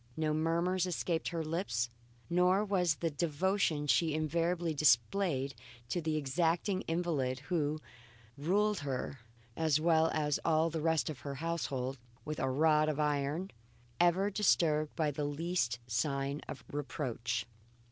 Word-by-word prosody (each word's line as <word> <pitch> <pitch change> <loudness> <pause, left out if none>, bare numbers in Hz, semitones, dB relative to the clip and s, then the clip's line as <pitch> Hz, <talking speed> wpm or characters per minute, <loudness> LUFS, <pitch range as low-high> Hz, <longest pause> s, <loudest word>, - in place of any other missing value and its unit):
No 155 -1 +1
murmurs 170 +4 +1
escaped 170 -1 -1
her 165 -2 -2
lips, 155 - -1 0.4
nor 180 +4 +3
was 180 -5 +2
the 165 +2 -2
devotion 160 +1 0
she 150 +4 +2
invariably 165 +2 0
displayed 140 - +2 0.4
to 175 - -1
the 155 -1 -1
exacting 170 +6 0
invalid 155 -7 -1
who 155 -3 +1 0.6
ruled 200 +8 +1
her 135 -2 -4 0.4
as 155 -2 +2
well 160 0 +4
as 150 -2 0
all 160 0 +2
the 160 -1 -2
rest 160 -1 +2
of 140 - -9
her 140 +2 -5
household 135 -5 -2 0.3
with 155 0 -4
a 135 - 0
rod 155 +2 +3
of 155 -1 -2
iron 150 +4 0 0.5
ever 180 +4 +3
disturbed 155 -7 +2
by 155 -3 +1
the 145 +1 -3
least 145 -4 -1
sign 140 +4 -1
of - - -7
reproach. 120 -6 -3
155 Hz, 135 wpm, -33 LUFS, 140-170 Hz, 0.6 s, well